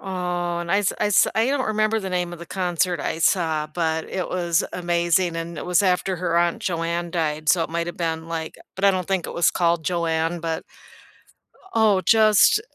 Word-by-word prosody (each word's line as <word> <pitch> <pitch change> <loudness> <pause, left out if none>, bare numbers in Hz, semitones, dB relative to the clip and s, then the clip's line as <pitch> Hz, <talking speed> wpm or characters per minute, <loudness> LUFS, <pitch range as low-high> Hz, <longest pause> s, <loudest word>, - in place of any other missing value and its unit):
Oh, 175 -2 -3
and 170 0 -5
I 200 - +3
s 205 - +1
I 210 - +2
s 205 - +4
I 220 +2 +2
don't 270 -1 0
remember 215 +1 +1
the 195 - -5
name 180 -1 -2
of 175 - -8
the 170 - -10
concert 180 -2 -1
I 160 - -3
saw, 160 -3 +1
but 160 0 -2
it 185 -2 -3
was 175 -2 0
amazing, 175 0 +1
and 165 -1 -5
it - - -6
was 180 +3 +3
after 185 0 +1
her 170 -1 -1
aunt 170 0 0
Joanne 170 0 -2
died, 155 -3 -2
so 170 -2 +4
it 160 - -8
might 170 +1 -2
have 175 - -7
been 165 -1 -3
like 160 -1 -4 0.2
but 195 - -2
I 200 - +6
don't 185 -2 -3
think 190 -3 0
it - - -7
was 170 - +3
called 170 -2 0
Joanne, 165 -1 -1
but 165 -1 -3 1.1
Oh, 215 -4 +3
just 215 - +5
175 Hz, 210 wpm, -23 LUFS, 165-190 Hz, 1.1 s, I